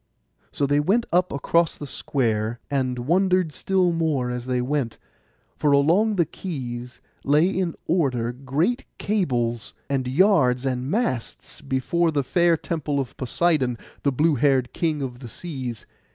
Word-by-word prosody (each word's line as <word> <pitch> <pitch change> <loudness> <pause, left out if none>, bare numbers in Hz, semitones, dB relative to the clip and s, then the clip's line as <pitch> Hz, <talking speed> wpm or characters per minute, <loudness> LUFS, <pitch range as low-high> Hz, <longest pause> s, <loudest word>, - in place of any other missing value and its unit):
So 140 - 0
they 145 +1 +2
went 205 +10 +2
up 180 +1 +3
across 165 +4 +1
the 145 - -6
square, 115 -5 -1
and 130 -3 0
wondered 180 +5 +2
still 185 +3 +1
more 150 -7 0
as 125 0 -5
they 125 -1 0
went; 125 -2 -1 0.6
for 150 - +2
along 175 +10 +3
the 170 -3 +3
quays 125 -8 -6 0.2
lay 150 +5 +4
in 185 -3 -1
order 130 -9 +1
great 140 - -1
cables, 120 - -1 0.2
and 130 -2 0
yards, 135 -5 +3
and 130 0 -1
masts, 190 - -2
before 140 +6 0
the 145 -3 0
fair 170 +4 +3
temple 150 -3 -2
of 130 -4 -4
Poseidon, 130 -2 +1 0.2
the 140 - +2
blue 150 +5 +2
haired 135 -2 +2
king 155 -4 -1
of 125 -2 -5
the 125 - -8
seas. 130 -7 -6
140 Hz, 150 wpm, -24 LUFS, 125-170 Hz, 0.6 s, lay